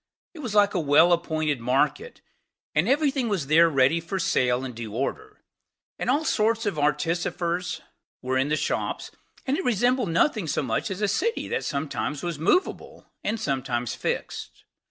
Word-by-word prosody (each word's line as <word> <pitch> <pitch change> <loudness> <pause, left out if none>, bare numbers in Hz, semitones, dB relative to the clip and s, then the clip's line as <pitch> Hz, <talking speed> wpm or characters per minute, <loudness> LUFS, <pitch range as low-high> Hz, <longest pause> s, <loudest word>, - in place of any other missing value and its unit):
It 335 - -12
was 240 -8 -4
like 205 -1 +4
a 185 - +1
well 155 +3 +5
appointed 155 -4 0
market; 140 - 0 0.5
and - - +2
every 285 +1 +3
thing 260 -4 -1
was 190 -8 -1
there 165 +4 +5
ready 140 +2 +3
for 170 +4 -4
sale 125 -7 +1
in 125 - -6
due 110 -2 -7
order; 425 - -4 0.6
and - - -2
all 290 +5 +2
sorts 225 -1 +1
of 195 -7 -1
artificers 170 +4 -1 0.4
were 130 +1 -1
in 135 +2 +1
the 155 - +2
shops; - - -2 0.3
and 275 +2 0
it - - -2
resembled 245 -1 +1
nothing 195 - +1
so 145 - 0
much 125 - -1
as 195 +2 -4
a - - +3
city 455 - -1
that 470 - -2
sometimes 140 -1 -3
was 170 -4 -3
movable, 365 - -1
and 220 +2 -1
sometimes 130 - -2
fixed. 120 - -4
170 Hz, 175 wpm, -25 LUFS, 140-225 Hz, 0.6 s, well